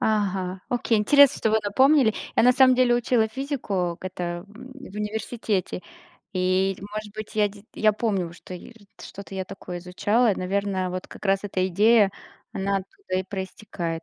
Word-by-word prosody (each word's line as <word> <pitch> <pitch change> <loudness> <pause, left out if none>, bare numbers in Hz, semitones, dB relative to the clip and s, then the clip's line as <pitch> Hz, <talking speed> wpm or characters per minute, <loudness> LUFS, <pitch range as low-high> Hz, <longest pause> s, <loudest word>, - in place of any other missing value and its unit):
Ага, 190 -4 0
окей, 240 -3 +1
интересно, 280 +6 +6
что 220 - +1
вы 220 - +4
напомнили. 260 +3 +4 0.2
Я - - +5
на 250 +2 +6
самом 255 0 +6
деле 245 -1 +4
учила 240 -2 +2
физику 220 - -2
к - - -13
это 175 -1 -4
в 255 +1 -12
университете. 210 -2 -2 0.5
И 185 +1 +1
может 210 +1 -7
быть, 215 0 -7
я 210 -1 +3
де 200 0 -15
я 215 -1 +3
помню, 200 -6 -1
что 180 +1 -10
р 180 - -11 0.3
что-то 200 0 -10
я 190 -1 -3
такое 180 -2 -8
изучала. 205 +6 +1
Наверное, 190 0 -1
вот 185 0 -5
как - - -12
раз 195 0 +3
эта 185 -2 0
идея, 210 +2 +4 0.4
она 195 +1 0
оттуда 295 - -6
и - - -1
проистекает. 190 -3 -5
205 Hz, 165 wpm, -25 LUFS, 185-225 Hz, 0.5 s, интересно